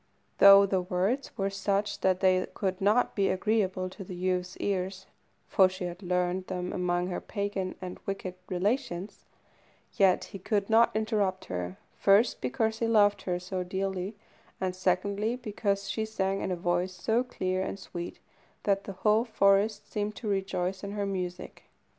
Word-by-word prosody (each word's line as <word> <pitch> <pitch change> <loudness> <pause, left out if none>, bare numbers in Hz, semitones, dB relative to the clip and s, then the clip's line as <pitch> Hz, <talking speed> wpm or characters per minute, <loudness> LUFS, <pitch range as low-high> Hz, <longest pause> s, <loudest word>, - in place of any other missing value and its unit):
Though 200 0 +9
the 190 -1 +1
words 190 +9 -1
were 195 0 0
such 200 +1 -1
that 185 -1 +1
they 185 -1 +3
could 190 -2 -2
not 210 +5 +3
be 195 -2 +2
agreeable 190 -2 0
to 195 - -8
the 185 0 -8
youth's 180 0 -1
ears 190 -1 -2 0.4
(for 190 -1 +5
she 185 0 -7
had 175 +1 -5
learned 180 0 -1
them 180 -1 -3
among 175 -1 0
her 180 - -3
pagan 200 -3 -3
and 180 0 -6
wicked 195 -2 -3 0.2
relations), 190 0 -2 0.7
yet 190 -2 +4
he 195 - -9
could 205 +2 -1
not 230 +1 +6
interrupt 210 -4 0
her, 90 0 -4 0.2
first, 205 +4 +3
because 220 - -1
he 230 - +1
loved 205 -2 +4
her 180 -1 -2
so 180 +1 -3
dearly, 190 +2 -3 0.4
and, 185 -1 -2
secondly, 200 +5 0
because 205 -4 -2
she 220 - -1
sang 195 -3 -1
in - - -2
a - - +1
voice 175 +1 0
so 220 +6 +1
clear 185 -7 -2
and 190 - -3
sweet 175 -2 -7 0.5
that 200 -1 +1
the 195 - -6
whole 215 +2 +5
forest 205 -1 +2
seemed 210 0 -2
to 225 - -6
rejoice 190 -1 -1
in 200 0 -5
her 205 -1 -1
music. 180 -2 -5
195 Hz, 165 wpm, -29 LUFS, 185-205 Hz, 0.7 s, Though